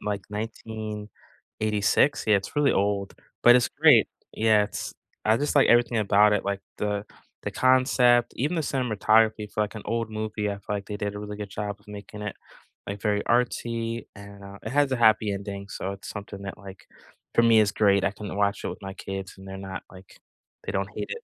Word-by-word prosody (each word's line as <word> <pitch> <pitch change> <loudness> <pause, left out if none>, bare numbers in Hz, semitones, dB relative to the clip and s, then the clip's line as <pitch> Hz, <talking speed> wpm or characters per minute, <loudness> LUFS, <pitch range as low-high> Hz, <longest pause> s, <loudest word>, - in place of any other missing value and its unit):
in, - - -11
like, 100 -2 -2
1986, 110 +1 -2
yeah, 105 - +5
it's 100 +9 -5
really 145 -1 +4
old, 100 0 0 0.3
but 120 +1 +8
it's 125 - +2
great. 145 -8 +5 0.3
Yeah, 110 -2 +3
it's 105 - -6 0.3
I 110 +1 +4
just 145 +4 -1
like 140 - +6
everything 120 -1 +4
about 105 0 +4
it, 105 - 0
like 100 0 -2 0.2
the 105 0 -1 0.4
the - - -3
concept, 125 -2 +4
even 150 +8 0
the - - +1
cinematography 110 -4 +2
for, 105 - 0
like, 105 - -4
an 110 - -6
old 115 -1 -1
movie, 110 -1 -3
I 100 - -2
feel 100 +1 -4
like 100 - -6
they 105 - -4
did 100 0 -3
a 105 - -5
really 105 0 -6
good 105 -1 -5
job 105 0 -4
of 105 - -24
making 105 0 -9
it, 105 - -4 0.5
like, 100 0 -5
very 105 -1 +1
artsy 115 -1 0
and, 100 -1 -12
uh, 100 0 -10
it 110 - -5
has 145 -2 +2
a - - +2
happy 110 -2 +4
ending, 100 0 -5
so 95 - -4
it's 100 - -9
something 100 -1 -8
that, 100 -1 -7
like, 95 -2 -12 0.5
for - - +5
me 115 -1 +6
is 100 -1 +2
great, 100 -2 +3
I 100 - +2
can 105 -1 -7
watch 100 0 +1
it - - -1
with - - -8
my 95 - -6
kids 95 -1 -6
and 95 - -12
they're 95 - -6
not, 95 -1 -6
like 95 0 -15 0.5
they - - -2
don't 100 0 -2
hate - - -4
it. 475 0 -5
105 Hz, 215 wpm, -26 LUFS, 100-115 Hz, 0.5 s, but